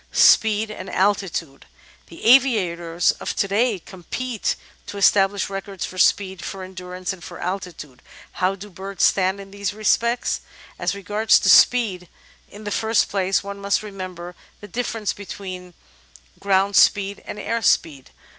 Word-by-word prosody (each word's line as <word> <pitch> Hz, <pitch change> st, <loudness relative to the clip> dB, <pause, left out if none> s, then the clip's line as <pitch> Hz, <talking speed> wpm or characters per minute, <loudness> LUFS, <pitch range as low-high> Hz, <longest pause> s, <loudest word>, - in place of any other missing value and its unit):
Speed 215 Hz, 0 st, +4 dB
and 190 Hz, -3 st, -8 dB
Altitude 185 Hz, -7 st, -1 dB, 0.4 s
The -, -, -12 dB
aviators 180 Hz, -10 st, +3 dB
of -, -, -4 dB
to 200 Hz, -, 0 dB
day 215 Hz, +2 st, +1 dB
compete 205 Hz, +7 st, -4 dB, 0.3 s
to 205 Hz, -, -7 dB
establish 200 Hz, 0 st, +3 dB
records 195 Hz, -1 st, -5 dB
for 185 Hz, -, -8 dB
speed, 190 Hz, -1 st, +2 dB
for 190 Hz, -1 st, -6 dB
endurance, 185 Hz, 0 st, -6 dB
and 180 Hz, -2 st, -13 dB
for -, -, -9 dB
altitude. 175 Hz, -8 st, -6 dB, 0.3 s
How 185 Hz, +1 st, 0 dB
do 200 Hz, +1 st, -11 dB
birds 195 Hz, +2 st, -5 dB
stand 190 Hz, +1 st, +2 dB
in 195 Hz, 0 st, -11 dB
these 200 Hz, 0 st, -4 dB
re 215 Hz, -, -10 dB
spects? 235 Hz, +3 st, +1 dB, 0.4 s
As -, -, -1 dB
regards 210 Hz, +3 st, +2 dB
speed, 200 Hz, -8 st, +4 dB, 0.4 s
in 210 Hz, +1 st, -12 dB
the 205 Hz, -, -5 dB
first 220 Hz, +2 st, +1 dB
place 195 Hz, -1 st, 0 dB
one 200 Hz, 0 st, -7 dB
must 200 Hz, +1 st, 0 dB
remember 185 Hz, -4 st, -7 dB, 0.3 s
the 205 Hz, -, -11 dB
diflFerence 225 Hz, -2 st, -3 dB
between 185 Hz, -2 st, -8 dB, 0.6 s
"groimd 195 Hz, 0 st, +2 dB
speed" 200 Hz, 0 st, +3 dB
and -, -, -6 dB
"air 230 Hz, +2 st, -2 dB
speed." 145 Hz, -10 st, +1 dB
195 Hz, 145 wpm, -22 LUFS, 185-205 Hz, 0.6 s, Speed